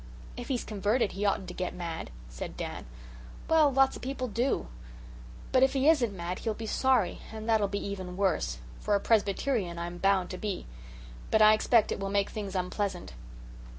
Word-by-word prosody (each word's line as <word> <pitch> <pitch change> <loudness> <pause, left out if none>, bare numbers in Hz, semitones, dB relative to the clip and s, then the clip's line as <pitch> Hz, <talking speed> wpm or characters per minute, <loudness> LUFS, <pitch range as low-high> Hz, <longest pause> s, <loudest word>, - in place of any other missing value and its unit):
"If 245 - -7
he's 255 -4 -1
converted 210 +1 0
he 205 +2 -1
oughtn't 195 -1 0
to - - -6
get 180 -1 -3
mad," 170 - -5 0.2
said - - -7
Dan. - - -5 0.6
"Well, 315 -3 +5
lots 270 0 +4
o' - - -11
people 255 0 -3
do. 240 - 0 0.9
But 255 - +4
if 265 +1 +4
he 275 +1 +2
isn't 260 -9 +4
mad 180 -1 -4
he'll 220 -2 -2
be 225 - -6
sorry, 240 -5 +2
and 220 0 -7
that'll 220 -3 +3
be 200 +1 -3
even 185 -2 -5
worse, 60 - 0 0.2
for 205 - +1
a - - +3
Presbyterian 205 -3 +1
I'm 175 +1 -5
bound 195 -1 +2
to 185 - -6
be. 205 -3 -3 0.6
But 220 - +5
I 215 0 +8
expect 220 0 +3
it - - -2
will 195 0 -2
make 200 0 +1
things 200 -3 -5
unpleasant." 185 - -2
205 Hz, 185 wpm, -29 LUFS, 185-240 Hz, 0.9 s, I